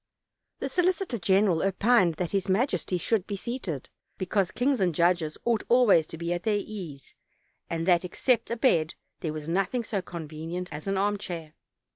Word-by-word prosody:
The - - -3
solicitor 360 - 0
general 190 -3 +3
opined 195 -2 +3
that 175 0 -3
his 195 -1 -1
majesty 190 -3 +1
should 200 +2 0
be 205 - -3
seated, 195 - -4 0.3
because 185 0 0
kings 265 0 +1
and 180 -4 +1
judges 170 -2 +2
ought 235 -2 +2
always 235 -10 +5
to 165 - -8
be 170 +1 -2
at 175 - -3
their 210 +1 +1
ease, 175 -11 -8 0.6
and 165 0 -2
that, 175 -1 +4
except 230 +6 0
a 235 - -2
bed, 165 - +2 0.2
there 160 - -3
was 155 0 -6
nothing 195 +8 0
so 205 -3 -2
convenient 165 +1 -6
as 150 +5 -7
an 195 0 0
armchair. 190 -6 -2
185 Hz, 170 wpm, -27 LUFS, 170-220 Hz, 0.6 s, always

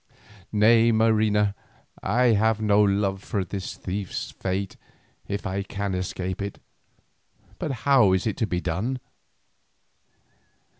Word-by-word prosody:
"Nay, 115 +2 +5
Marina, 110 -2 +3 0.5
I 120 +5 +2
have 110 +1 +2
no 105 -1 +3
love 100 -1 +1
for 100 -3 -2
this 95 +2 -5
thief's 95 0 -4
fate 95 +1 -3 0.5
if 100 0 -4
I 95 +1 -2
can 100 0 -4
escape 90 0 -3
it, 100 0 -5 1.0
but - - -2
how 130 -9 +5
is 95 - +1
it 110 - -1
to 110 - 0
be 90 -3 -2
done?" 105 +11 -2
100 Hz, 120 wpm, -25 LUFS, 95-110 Hz, 1.0 s, Nay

